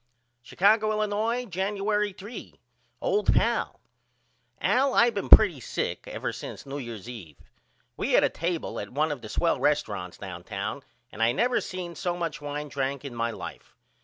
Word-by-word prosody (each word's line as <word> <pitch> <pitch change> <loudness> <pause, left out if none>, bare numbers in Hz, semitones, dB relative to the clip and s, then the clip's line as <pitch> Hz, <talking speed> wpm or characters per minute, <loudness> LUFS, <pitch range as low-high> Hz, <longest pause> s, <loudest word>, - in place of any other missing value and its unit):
Chicago, 210 - +3
Illinois, 215 +3 0
Januery 205 +2 0
3. 205 +5 -9 0.5
OLD 425 -4 +2
PAL: - - +1 0.8
Al 265 +1 +2
I 235 +1 +6
been 200 - -4
pretty 190 -10 +8
sick - - -3
ever - - -3
since - - -8
New 140 +1 -5
Year's 115 -5 -7
eve. 95 - -9 0.6
We - - -1
had - - +6
a - - +4
table 170 0 -3
at - - -5
1 150 +4 0
of 140 -4 -4
the 110 - -8
swell 165 +9 +1
resturunts 105 -12 0
downtown 100 +6 -5 0.3
and 115 - -7
I 115 +1 +4
never 245 - +2
seen 180 -2 -5
so 175 +1 -2
much 165 -4 -3
wine 145 +1 -4
drank 140 0 -2
in 135 - -6
my 115 0 -1
life. 115 - -8
160 Hz, 160 wpm, -27 LUFS, -, 0.8 s, pretty